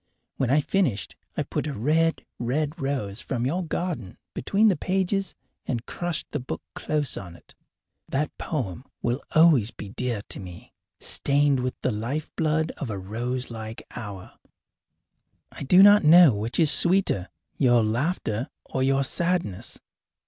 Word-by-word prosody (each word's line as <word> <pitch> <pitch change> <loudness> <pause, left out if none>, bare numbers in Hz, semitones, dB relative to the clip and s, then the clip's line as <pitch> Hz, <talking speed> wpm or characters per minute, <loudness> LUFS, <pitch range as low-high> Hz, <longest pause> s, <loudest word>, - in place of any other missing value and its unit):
When 130 - 0
I 145 +3 +4
finished 145 - -1 0.2
I - - +1
put - - -3
a 145 - -4
red, 160 +8 +1
red 145 +6 -2
rose 120 -7 -2
from 125 -1 -2
your 175 +8 -1
garden 160 - -4 0.2
between 205 - +2
the 200 - +4
pages 190 +3 -1 0.3
and 120 -2 -2
crushed 175 -3 -3
the 145 - -2
book 125 - -6
close 150 -2 -2
on 90 -3 -8
it. - - -17 0.6
That 145 +3 -1
poem 125 - -3 0.2
will 120 +3 0
always 155 -9 +6
be 105 - -9
dear 115 -1 -3
to - - -5
me, 90 -3 -11 0.3
stained 140 -1 +2
with 125 0 -3
the - - 0
life 120 +9 -3
blood 160 0 +1
of 135 - -5
a 105 - -3
rose 120 +6 -4
like 110 0 -7
hour. 100 -6 -8 1.1
I - - -11
do 180 +8 +6
not 205 -1 +7
know 160 -2 +8
which 110 +7 -2
is 155 -3 +6
the - - +10
sweeter, 175 - +3 0.3
your 120 -4 +4
laughter 115 - -1 0.2
or 130 - -3
your 135 +1 +2
sadness. 170 - -2
135 Hz, 155 wpm, -25 LUFS, 115-160 Hz, 1.1 s, the